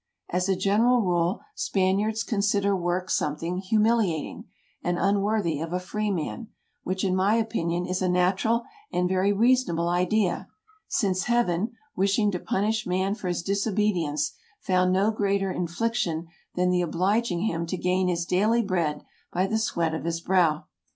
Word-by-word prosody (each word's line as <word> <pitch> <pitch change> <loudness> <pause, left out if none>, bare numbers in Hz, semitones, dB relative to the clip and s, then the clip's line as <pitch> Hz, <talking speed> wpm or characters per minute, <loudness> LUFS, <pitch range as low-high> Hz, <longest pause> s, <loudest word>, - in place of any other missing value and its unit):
As 180 +2 0
a 190 - +3
general 230 +6 +3
rule, 175 -1 0
Spaniards 205 +3 0
consider 200 -2 +1
work 180 0 -1
something 165 +4 -1
humiliating, 210 -4 +1 0.4
and 175 0 0
unworthy 200 -5 +1
of 165 +1 -4
a 180 - 0
freeman, 205 +2 -3 0.3
which, 185 +1 -3
in 185 -2 +1
my 195 +4 +3
opinion, 180 -6 -1
is 185 +1 -2
a 185 - +1
natural 185 +6 +2 0.3
and 180 0 +1
very 190 +2 +2
reasonable 205 -6 +2
idea, 180 +5 +1 0.4
since 195 - 0
Heaven, 235 -3 +1 0.2
wishing 200 +2 +2
to 180 - -3
punish 215 +3 -1
man 190 +2 0
for 210 -3 -6
his 175 -1 -2
disobedience, 195 -7 0 0.3
found 185 -1 +2
no 195 +4 +3
greater 200 -2 0
infliction 175 -2 -1 0.3
than 180 0 +2
the 180 0 +2
obliging 180 +3 0
him 170 -5 -1
to 185 - -3
gain 185 +1 +1
his 170 -1 0
daily 215 +7 +2
bread 170 -7 -1 0.3
by 185 +2 +1
the 220 +3 0
sweat 170 -7 0
of 160 - -4
his 170 0 -1
brow. 170 -4 +2
185 Hz, 150 wpm, -26 LUFS, 175-210 Hz, 0.4 s, a